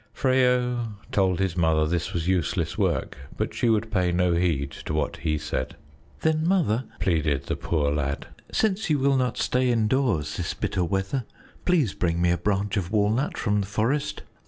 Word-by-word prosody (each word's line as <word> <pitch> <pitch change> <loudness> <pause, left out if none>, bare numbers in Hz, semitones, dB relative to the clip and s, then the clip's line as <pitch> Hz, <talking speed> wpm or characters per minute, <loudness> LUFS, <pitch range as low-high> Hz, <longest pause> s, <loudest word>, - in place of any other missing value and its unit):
Freyo 125 -3 +2 0.2
told 95 -3 +2
his 95 -3 0
mother 80 -3 +3
this 85 +1 -1
was 85 -1 -2
useless 90 -6 0
work, - - -1 0.2
but - - -2
she 120 - +1
would 110 0 +1
pay 90 -4 +2
no 90 0 +2
heed 80 -5 0
to 75 - -5
what 75 - -1
he 75 -2 -1
said. 65 -3 -3 0.5
"Then, 160 0 +1
Mother," 145 - +2
pleaded 80 -6 +1
the - - -2
poor 75 -4 0
lad, 70 -1 -2 0.3
"since 215 -2 +1
you 150 - +3
will 140 0 +3
not 125 -1 0
stay 125 0 +1
indoors 115 - +1
this 85 - -3
bitter 90 - -1
weather, 95 +8 -1 0.4
please 160 - +2
bring 85 -1 0
me 85 0 +3
a 85 - +2
branch 100 0 0
of 90 -2 -2
walnut 110 +6 +1
from 105 -2 +1
the 100 - -4
forest. 125 +9 -1
100 Hz, 180 wpm, -25 LUFS, 85-125 Hz, 0.5 s, mother